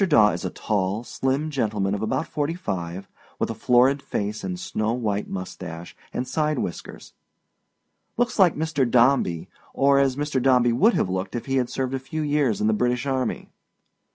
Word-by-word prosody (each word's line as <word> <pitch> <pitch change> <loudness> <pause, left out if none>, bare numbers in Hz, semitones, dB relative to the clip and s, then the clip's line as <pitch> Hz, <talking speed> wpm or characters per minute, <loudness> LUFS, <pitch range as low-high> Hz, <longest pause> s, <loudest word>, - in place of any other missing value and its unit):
Daw 130 - +5
is - - -5
a - - -1
tall, 100 +1 -1
slim 135 +5 -1
gentleman 105 -7 0
of 105 - -2
about 110 +8 -1
fifty 150 +2 -2
five, 95 - -4 0.3
with - - -1
a - - -3
florid 130 +3 +3
face 105 -5 -3
and 180 -1 -4
snow 115 - -1
white 105 -4 -2
mustache 90 -2 -7 0.2
and 125 - -3
side 155 -2 0
whiskers. 90 - -6 1.0
Looks 240 -1 0
like 180 -4 +5
Mr. 150 -5 0
Dombey, 120 -9 +3 0.3
or 140 0 +4
as 135 -2 +2
Mr. 145 -2 -1
Dombey 125 -2 +4
would 215 - +4
have - - +1
looked 95 +3 -3
if 120 - -4
he 135 0 0
had 125 -2 0
served 130 0 -2
a 135 - -1
few 155 +4 -4
years 145 -7 +1
in 105 - 0
the 110 - +3
British 125 +3 0
Army. 130 -2 -2
125 Hz, 180 wpm, -24 LUFS, 105-145 Hz, 1.0 s, Daw